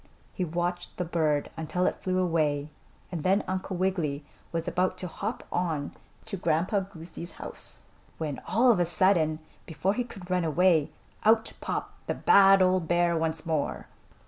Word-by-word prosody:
He 185 - -2
watched 175 +1 -2
the 180 - -1
bird 155 -3 0
until 165 +3 -1
it - - 0
flew 185 -1 0
away, 155 -5 +1 0.4
and 170 -4 -3
then 190 +5 +2
Uncle 185 0 -3
Wiggily 165 -6 -1 0.3
was 165 +1 -3
about 185 +1 0
to 185 - -3
hop 200 +7 -4
on 160 -5 -1 0.3
to 220 -3 -5
Grandpa 180 +4 +1
Goosey's 170 -2 -8
house - - -9 0.3
when, 150 -4 -4
all 240 +5 +5
of 210 - +2
a 175 - +3
sudden, 170 -3 +3 0.3
before 170 +5 0
he 245 - -1
could 195 -6 -10
run 180 -1 +2
away, 165 -1 +3 0.3
out 220 +1 +3
popped - - -5
the - - -1
bad 195 -1 +6
old 185 -2 +2
bear 175 0 +2
once 160 -1 -2
more. 160 -3 -1
175 Hz, 165 wpm, -28 LUFS, 160-185 Hz, 0.4 s, bad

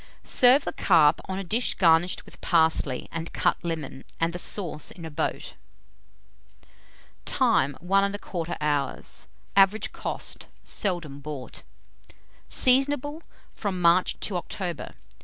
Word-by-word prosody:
Serve 255 +3 +5
the - - -3
carp 160 -4 +4
on 190 - -4
a 195 - -4
dish 225 +7 0
garnished 170 0 +3
with - - -16
parsley 160 -6 +1
and 165 0 -6
cut - - 0
lemon, 160 -5 -5 0.2
and 165 +1 0
the 175 - -5
sauce 175 -6 -1
in 170 - -10
a 160 - -7
boat. 145 - -3 1.7
Time. 135 +1 +1
1 195 +3 +2
1/4 175 -4 -5
hour. 145 -2 -1 0.6
Average 195 +2 +3
cost. - - -3 0.2
Seldom 170 -8 -3
bought. 145 -3 -7 0.9
Seasonable 285 +4 +3 0.3
from 195 -4 -3
March 175 +1 +3
to 190 - -1
October. 175 -1 -5
175 Hz, 120 wpm, -26 LUFS, 160-200 Hz, 1.7 s, Serve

